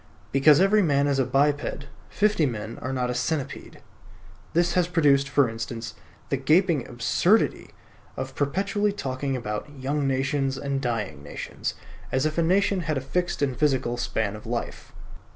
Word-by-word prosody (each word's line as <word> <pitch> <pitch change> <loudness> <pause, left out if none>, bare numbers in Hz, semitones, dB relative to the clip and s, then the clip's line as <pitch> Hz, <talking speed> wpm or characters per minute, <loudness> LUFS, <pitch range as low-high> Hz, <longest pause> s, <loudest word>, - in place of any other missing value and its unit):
Because 140 +2 +6
every 200 +3 +4
man 145 -5 +2
is 140 -1 +1
a 135 - +3
biped, 140 +2 0 0.2
fifty 210 -7 +2
men 115 -1 -5
are 130 - -3
not 125 -2 -1
a - - -2
centipede. 140 +3 -3 0.7
This 175 +1 +2
has 180 -2 +2
produced, 140 -5 +3
for 140 -2 +3
instance, 115 +1 -5 0.4
the 140 - +1
gaping 155 +2 +2
absurdity 125 - +1 0.5
of - - -4
perpetually 200 +8 0
talking 135 -6 -3
about 105 +2 -4
"young 140 +2 -1
nations" 135 0 0
and 140 0 -2
"dying 105 - -3
nations," 70 - -5 0.4
as 130 +2 +1
if 155 +2 0
a - - +4
nation 190 +3 +2
had 155 -4 -1
a - - +1
fixed 175 +4 -2
and 135 -3 0
physical 130 -5 +1
span 110 -3 -2
of 105 - -10
life. 120 0 -4
140 Hz, 160 wpm, -25 LUFS, 125-160 Hz, 0.7 s, Because